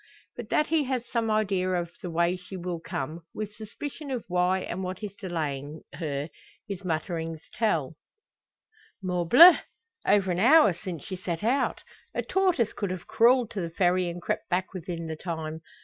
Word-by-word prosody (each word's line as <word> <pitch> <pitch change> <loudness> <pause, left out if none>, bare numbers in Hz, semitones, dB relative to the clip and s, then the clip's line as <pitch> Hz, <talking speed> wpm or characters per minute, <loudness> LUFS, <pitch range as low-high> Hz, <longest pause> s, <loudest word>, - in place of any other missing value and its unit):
But - - -7
that 300 - +3
he 310 -2 +1
has 255 -2 -2
some 230 -2 -1
idea 195 -4 +1
of 170 -1 -2
the 180 - -5
way 170 +2 +2
she 185 +1 -9
will 175 -1 -4
come, 155 +1 -5
with 210 -1 -4
suspicion 275 +8 -7
of 255 -4 -3
why 180 +1 +2
and 185 +1 -4
what 185 +3 -5
is 205 -2 -4
delaying 155 -6 -4
her, 145 -1 -3 0.4
his 200 -2 -5
mutterings 165 -1 -3
tell: 165 - 0 1.1
"Morbleu! 185 - +8 0.5
over 195 -2 +4
an 175 - -1
hour 260 - +7
since 170 -3 -7
she 190 - -5
set 180 0 -4
out! 255 +5 +1 0.3
A - - 0
tortoise 365 - +1
could 200 - -3
have 185 -1 -5
crawled 240 0 +4
to 200 - -3
the 170 - -3
Ferry, 180 +1 +2
and 170 0 -7
crept - - -2
back 180 +2 -1
within 170 -2 -5
the 160 -1 -4
time! 160 -1 -5
180 Hz, 175 wpm, -27 LUFS, 170-215 Hz, 1.1 s, Morbleu